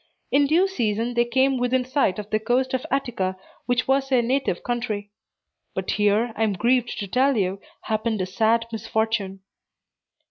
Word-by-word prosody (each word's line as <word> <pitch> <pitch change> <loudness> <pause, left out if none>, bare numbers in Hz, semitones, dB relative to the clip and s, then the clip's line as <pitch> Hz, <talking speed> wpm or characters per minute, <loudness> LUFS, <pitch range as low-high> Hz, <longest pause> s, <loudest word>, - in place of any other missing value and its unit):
In 280 0 +4
due 340 +6 +4
season, 235 - -1
they 240 0 +2
came 260 +2 +2
within 250 +1 +1
sight 255 -7 +1
of 210 -1 -5
the 215 - +2
coast 250 +4 0
of 260 +4 -2
Attica, 230 -9 -1 0.3
which 245 0 +1
was 270 0 +2
their 255 -3 +3
native 255 -6 0
country. 220 -4 -3 0.6
But - - -2
here, 210 +3 +2
I - - -5
am 220 -2 +2
grieved 240 +5 +1
to 200 - -4
tell 260 +5 +2
you, 195 -1 -1 0.2
happened 220 0 -1
a 185 - 0
sad 225 +5 +1
misfortune. 220 -3 -2
235 Hz, 170 wpm, -24 LUFS, 210-260 Hz, 0.6 s, In